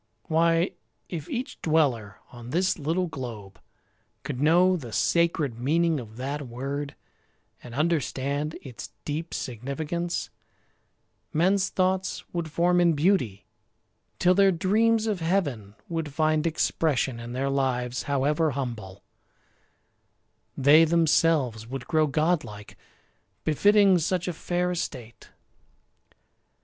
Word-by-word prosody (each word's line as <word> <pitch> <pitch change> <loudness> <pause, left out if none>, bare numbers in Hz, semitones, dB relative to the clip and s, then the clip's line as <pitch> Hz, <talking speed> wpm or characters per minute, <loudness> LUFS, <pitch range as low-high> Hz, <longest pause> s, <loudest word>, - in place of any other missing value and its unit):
Why, 165 +2 +2 0.4
if 160 -5 -6
each 250 +2 -5
dweller 135 -10 +1
on 120 -1 -10
this 180 +5 +1
little 165 +5 0
globe 115 - -8 0.6
Could 140 -2 -4
know 175 +5 +5
the 130 -10 -7
sacred 155 -5 +1
meaning 160 +4 +1
of 110 -2 -10
that 140 +2 -4
word 140 +4 -5 0.7
And 120 -1 -10
understand 150 -1 -1
its 125 -4 -8 0.2
deep 155 +3 -4
significance, 150 +8 -4 1.0
Men's 185 +5 +2
thoughts 185 0 0
would 170 -2 -3
form 175 +3 +2
in 170 -1 +4
beauty, 145 - +1 0.7
till 180 0 +4
their 195 +1 +5
dreams 220 +6 +2
Of 210 -4 -1
heaven 145 - -1
would 165 -3 -3
find 155 +2 +1
expression 140 -6 0
in 120 +1 -7
their 135 +2 -1
lives, 125 -2 -1
However 150 +3 +2
humble; 110 -8 -5 1.5
they 145 +4 +6
themselves 155 -8 +2
would 130 +1 -6
grow 155 -1 +2
Godlike, 145 -9 -1 0.7
befitting 200 +4 +4
such 180 +2 -1
a 180 - -1
fair 175 +2 -1
estate. 125 -9 -6
155 Hz, 115 wpm, -26 LUFS, 130-170 Hz, 1.5 s, they